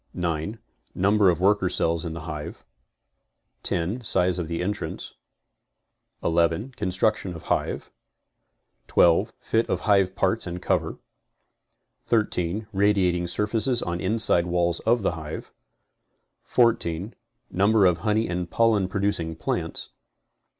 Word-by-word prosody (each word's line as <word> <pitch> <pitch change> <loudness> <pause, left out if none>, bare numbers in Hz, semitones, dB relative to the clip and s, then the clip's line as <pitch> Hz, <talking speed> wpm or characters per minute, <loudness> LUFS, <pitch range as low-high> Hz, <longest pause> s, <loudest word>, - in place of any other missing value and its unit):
9. 85 +4 -2 0.4
Number 100 +1 +4
of 85 - +1
worker 95 0 +3
cells 85 0 0
in 80 - -4
the 85 - -7
hive. 75 -2 -7 1.0
10. 90 +9 0
Size 90 -4 +2
of 80 -2 -4
entrance. 90 +5 -3 1.1
11. 85 +8 +1
Construction 95 -3 -1
of 80 - -10
hive. - - -3 1.0
12. 90 +6 +4
Fit 115 +1 0
of - - -1
hive 100 -3 +2
parts 110 0 0
and 90 +1 -5
cover. - - -1 1.1
13. 105 -3 0
Radiating 95 -3 +2
surface 110 +7 0
on 85 0 -3
inside 95 -3 +3
walls 85 -1 +1
of 115 -1 +3
the - - +2
hive. 80 -2 -7 0.9
14. 105 -5 +1 0.4
Number 100 +2 +3
of 90 -2 +3
honey 110 +1 +1
and 90 0 -3
pollen 110 -3 +2
producing 95 -4 -1
plants. 80 - -3
95 Hz, 115 wpm, -25 LUFS, 85-105 Hz, 1.1 s, Number